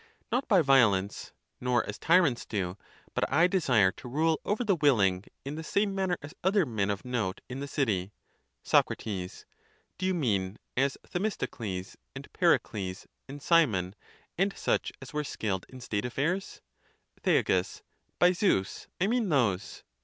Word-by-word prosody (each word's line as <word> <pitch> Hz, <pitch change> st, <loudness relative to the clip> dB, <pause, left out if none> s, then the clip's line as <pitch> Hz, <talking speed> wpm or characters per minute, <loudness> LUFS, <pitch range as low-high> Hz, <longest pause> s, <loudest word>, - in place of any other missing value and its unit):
Not 250 Hz, +4 st, 0 dB
by 190 Hz, -6 st, +5 dB
violence, 110 Hz, -8 st, +3 dB, 0.3 s
nor 125 Hz, -2 st, +1 dB
as -, -, -6 dB
tyrants 165 Hz, -8 st, +3 dB
do; 95 Hz, -4 st, -3 dB, 0.4 s
but -, -, -1 dB
I 160 Hz, +5 st, +5 dB
desire 130 Hz, -, +3 dB
to 125 Hz, -, -11 dB
rule 155 Hz, +5 st, +1 dB
over 215 Hz, +4 st, 0 dB
the 205 Hz, -5 st, +2 dB
willing, 105 Hz, -, +3 dB, 0.2 s
in 140 Hz, -, -4 dB
the 160 Hz, +1 st, -5 dB
same 200 Hz, +5 st, 0 dB
manner 190 Hz, -2 st, 0 dB
as 145 Hz, +3 st, -9 dB
other 190 Hz, 0 st, +3 dB
men 105 Hz, -6 st, -1 dB
of 100 Hz, +3 st, -3 dB
note 115 Hz, -7 st, -2 dB
in 130 Hz, +1 st, -6 dB
the 140 Hz, -, -4 dB
city. 105 Hz, -10 st, -1 dB, 0.5 s
Soc. -, -, +4 dB, 0.2 s
Do 95 Hz, -5 st, -3 dB, 0.7 s
you 185 Hz, 0 st, +1 dB
mean, 100 Hz, -, 0 dB, 0.2 s
as 135 Hz, +2 st, +1 dB
Themistocles, 115 Hz, -, -4 dB, 0.2 s
and -, -, -10 dB
Pericles, 95 Hz, -3 st, 0 dB, 0.2 s
and 145 Hz, +1 st, -7 dB
Ci 170 Hz, -1 st, +6 dB
mon, 95 Hz, -4 st, -3 dB, 0.5 s
and 195 Hz, +1 st, +1 dB
such -, -, 0 dB
as 135 Hz, -, -11 dB
were 150 Hz, 0 st, -1 dB
skilled 100 Hz, -8 st, -3 dB
in 130 Hz, -, -11 dB
state 105 Hz, -3 st, -3 dB
affairs? 160 Hz, +10 st, -2 dB, 0.6 s
Thea. -, -, +3 dB, 0.7 s
By 175 Hz, 0 st, +5 dB
Zeus, 175 Hz, -, 0 dB
I 185 Hz, -, +2 dB
mean 230 Hz, -1 st, +1 dB
those. 100 Hz, -, 0 dB
135 Hz, 155 wpm, -29 LUFS, -, 0.7 s, Ci